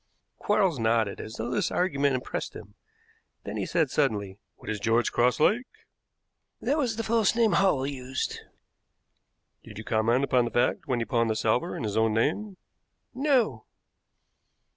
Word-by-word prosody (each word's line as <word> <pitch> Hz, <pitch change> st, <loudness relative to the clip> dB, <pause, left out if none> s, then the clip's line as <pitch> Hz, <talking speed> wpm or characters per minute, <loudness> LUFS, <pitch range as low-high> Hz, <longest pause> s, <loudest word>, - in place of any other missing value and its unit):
Quarles 195 Hz, -, +1 dB
nodded, 115 Hz, -2 st, +1 dB
as 110 Hz, -, -8 dB
though 115 Hz, +2 st, -4 dB
this -, -, 0 dB
argument 145 Hz, -6 st, +1 dB
impressed 125 Hz, -, -4 dB
him; -, -, -11 dB, 0.7 s
then -, -, -6 dB
he -, -, -2 dB
said -, -, +1 dB
suddenly: 100 Hz, -2 st, -1 dB, 0.2 s
"What -, -, -17 dB
is 110 Hz, -1 st, -2 dB
George 115 Hz, +3 st, +1 dB
Cross 125 Hz, +3 st, +2 dB
like?" 225 Hz, +11 st, +2 dB, 0.9 s
"That 295 Hz, -, 0 dB
was 245 Hz, -6 st, 0 dB
the 225 Hz, -, -3 dB
false 225 Hz, -1 st, +2 dB
name 230 Hz, -2 st, +3 dB
Hall 185 Hz, -9 st, +2 dB
used." 130 Hz, -2 st, -4 dB, 1.2 s
"Did 105 Hz, -, -12 dB
you 110 Hz, -, -6 dB
comment 115 Hz, +4 st, +1 dB
upon 125 Hz, -3 st, +2 dB
the -, -, -2 dB
fact 120 Hz, +5 st, 0 dB
when 130 Hz, -3 st, 0 dB
he 115 Hz, -, -1 dB
pawned 115 Hz, +1 st, +1 dB
the 110 Hz, -, 0 dB
salver 110 Hz, +2 st, 0 dB
in -, -, -5 dB
his 105 Hz, -1 st, -2 dB
own 110 Hz, -1 st, +2 dB
name?" 185 Hz, -, -1 dB, 0.6 s
"No." 250 Hz, -, +1 dB
125 Hz, 165 wpm, -27 LUFS, -, 1.2 s, name